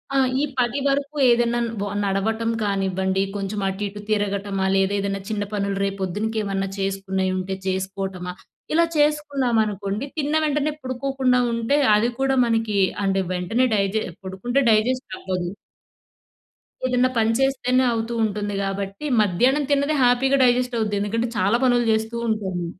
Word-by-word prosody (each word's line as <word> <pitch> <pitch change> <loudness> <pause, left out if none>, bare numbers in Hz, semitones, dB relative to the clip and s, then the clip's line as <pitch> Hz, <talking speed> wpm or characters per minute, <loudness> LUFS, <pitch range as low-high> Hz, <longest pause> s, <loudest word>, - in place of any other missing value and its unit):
ఆ! - - +3 0.2
ఈ - - +1 0.2
పది 245 +3 +1
వరకు 280 +2 -1
ఏదైనా 240 0 +3 0.2
వ 205 - -1 0.2
నడవటం 220 +4 0
కానివ్వండి. 190 -1 0
కొంచెం 200 +1 -3
అటు 190 +2 -4
ఇటు 205 +1 -8
తిరగటమా 200 -2 -1
లేదా 195 +1 +2
ఏదైనా 195 0 -2
చిన్న 210 -2 -1
పనులు 200 -1 -1
రేపు 195 0 -3
పొద్దునకేమన్నా 200 0 -2
చేసుకునేయి 190 -1 -1
ఉంటే 190 +1 -3
చేసుకోవటమా. 190 -1 -3 0.4
ఇలా 335 +1 +4
చేసుకున్నామనుకోండి, 245 -8 0
తిన్న 295 0 -1
వెంటనే 300 0 +1
పడుకోకుండా 260 0 0
ఉంటే 230 +5 +1 0.2
అది 220 +3 +2
కూడా 270 0 +2
మనకి 225 -3 0 0.3
అంటే 195 0 +1
వెంటనే 205 +8 +1
డైజె 200 +2 0 0.2
పడుకుంటే 190 +8 -1
డైజెస్ట్ 225 +2 +1
అవ్వదు. 180 -2 -3 1.4
ఏదన్నా 255 0 +2
పని 225 0 +3
చేస్తేనే 260 -1 +2
అవుతూ 230 +1 -2
ఉంటుంది 205 -1 -2
గాబట్టి 195 +6 -4
మధ్యాహ్నం 245 +9 +2
తిన్నది 285 +2 +2
హ్యాపీ‌గా 250 +2 +4
డైజెస్ట్ 250 0 +2
అవుద్ది. 210 -2 0
ఎందుకంటే 230 +4 -1
చాలా 200 +5 +3
పనులు 245 -1 +3
జేస్తూ 220 +1 0
ఉంటాము. 190 -5 -2
215 Hz, 135 wpm, -23 LUFS, 195-250 Hz, 1.4 s, ఇలా